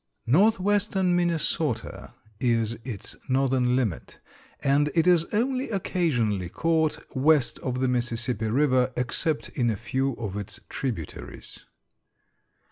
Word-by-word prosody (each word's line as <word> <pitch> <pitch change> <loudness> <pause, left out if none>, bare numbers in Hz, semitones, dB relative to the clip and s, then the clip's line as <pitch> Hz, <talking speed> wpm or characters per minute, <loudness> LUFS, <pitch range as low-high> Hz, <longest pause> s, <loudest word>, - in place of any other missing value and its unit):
Northwestern 195 - +3
Minnesota 160 -7 -1 0.2
is 115 -3 +1
its 115 -7 -4
northern 130 -1 +2
limit, 115 -10 -2 0.4
and 145 +2 +3
it 165 -1 +3
is 175 -2 +5
only 255 +6 -1
occasionally 125 - 0
caught 160 - +1 0.2
west 140 -1 +3
of 130 -1 -3
the 130 - +2
Mississippi 120 -2 -1
River, 130 +1 +2
except 135 +5 -1
in 120 -3 0
a 110 - -1
few 130 +4 -1
of 105 -4 -5
its 100 -2 -5
tributaries. 110 - -6
130 Hz, 115 wpm, -26 LUFS, 120-165 Hz, 0.4 s, is